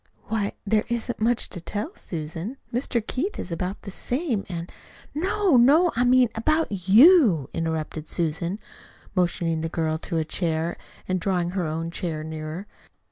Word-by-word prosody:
"Why, 210 -2 0
there 215 +1 +2
isn't 235 0 -2
much 235 +2 +1
to 175 - -6
tell, 210 - -4
Susan. 165 - -5 0.2
Mr. 240 -2 -1
Keith 360 - -2
is 175 - -5
about 180 +4 -3
the 200 - -7
same, 245 - -1
and 170 -1 -5 0.2
" - - -23
"No, 375 0 +2
no, 305 +9 +6
I 245 - +2
mean 250 -1 +5
about 225 - 0
YOU" 225 - +7
interrupted 160 -1 -3
Susan, 170 +3 -1 0.6
motioning 170 -3 0
the 165 - -2
girl 160 -1 -1
to 165 0 -3
a 160 - 0
chair, 165 0 -1 0.3
and 185 0 0
drawing 175 -1 0
her 180 -3 -1
own 165 +2 -3
chair 165 -3 -3
nearer. 155 +4 -5
185 Hz, 160 wpm, -25 LUFS, 165-240 Hz, 0.6 s, YOU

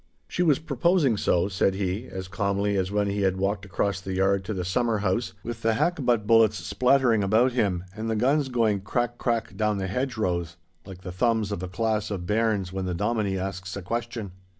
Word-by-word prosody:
'She - - -2
was 155 -6 +4
proposing 155 -2 +2
so,' 90 -2 +1
said 95 0 +1
he, 100 +5 -2
as 95 -1 -6
calmly 100 +1 0
as 95 -1 0
when 105 0 +1
he 100 0 -1
had 95 -1 +1
walked 100 +1 -1
across 100 0 -1
the 95 0 -5
yard 95 +1 +2
to 100 - -5
the 95 -4 -3
summer 115 +4 +1
house, 100 0 -1
with 115 0 -6
the 115 0 +2
hackbutt 125 -8 +1
bullets 110 -1 +5
splattering 125 -3 +2
about 110 +6 +3
him 100 -8 0
and 110 +1 -4
the 110 - 0
guns 135 +5 +2
going 110 -5 +1
crack 120 +4 -2
crack 115 -2 -1
down 105 -1 0
the 95 - -2
hedgerows, 95 - -2 0.3
like 95 -2 -10
the 90 - -6
thumbs 110 +2 +1
of 100 - -3
a 95 - -3
class 110 +2 -1
of 95 -4 -4
bairns 105 -2 0
when 95 0 -3
the 90 -1 -2
dominie 105 0 0
asks 95 0 -4
a - - -5
question. 115 0 -4
105 Hz, 205 wpm, -26 LUFS, 95-115 Hz, 0.3 s, bullets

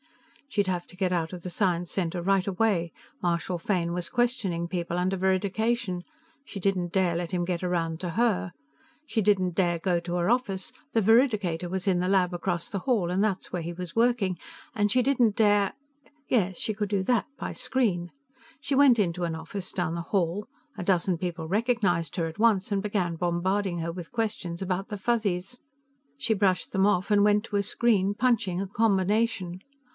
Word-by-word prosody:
She'd 205 -7 +1
have 180 -2 -2
to 180 - -12
get 185 -1 0
out 165 -2 -1
of 180 -2 -8
the 180 - -4
Science 175 -2 0
Center 175 -2 -1
right 195 +1 +2
away. 190 -4 +1 0.3
Marshal 175 +1 0
Fane 170 -1 -1
was 175 -1 -3
questioning 235 -9 0
people 175 -1 -3
under 185 +2 +1
veridication; 190 +1 0 0.4
she 210 - -8
didn't 185 -2 0
dare 180 -3 +2
let 170 -1 -3
him 175 -1 0
get 175 0 -2
around 165 -2 -1
to 180 - -2
her. 210 -2 +1 0.5
She 225 - 0
didn't 190 -3 +2
dare 175 -1 +1
go 175 -1 +1
to 175 +1 -4
her 175 +2 +1
office; 205 -6 0 0.2
the 225 - +2
veridicator 205 -7 +3
was 190 +1 -3
in 185 -2 +3
the 180 +1 0
lab 185 -2 +3
across 175 -1 -2
the 200 - -3
hall, 195 -6 0
and 190 +3 +1
that's 195 -4 -2
where 180 - -1
he 165 +1 -4
was 175 0 -7
working. 230 -6 +2 0.4
And 205 -1 +2
she 255 - +4
didn't 245 -5 +2
dare 205 -2 +4 0.6
Yes, 195 -7 +1
she 215 - -1
could 210 -1 -3
do 200 -2 +1
that, 240 +3 +1
by - - -4
screen. 195 -10 0 0.5
She 280 - -1
went 265 -4 +6
into 180 -3 0
an 165 -2 -1
office 180 +4 -6
down 175 -3 -1
the 170 - -3
hall; 185 +2 -1 0.3
a - - -4
dozen 180 -1 +1
people 170 -2 -4
recognized 200 -4 0
her 170 - +1
at 165 +4 -7
once 215 -3 +3
and 195 - +1
began 195 -5 -1
bombarding 175 +2 0
her 165 0 -2
with 175 -1 -8
questions 210 -7 -3
about 190 +2 -2
the 205 - -4
Fuzzies. 205 0 -1 0.6
She 235 -5 +1
brushed 195 -3 +1
them 195 0 +2
off 200 -1 +1
and 205 -1 +4
went 210 +1 +3
to 210 - -5
a 200 - +2
screen, 205 -2 +1
punching 215 -7 +1
a 195 - -2
combination. 200 -2 +1
190 Hz, 190 wpm, -27 LUFS, 175-210 Hz, 0.6 s, went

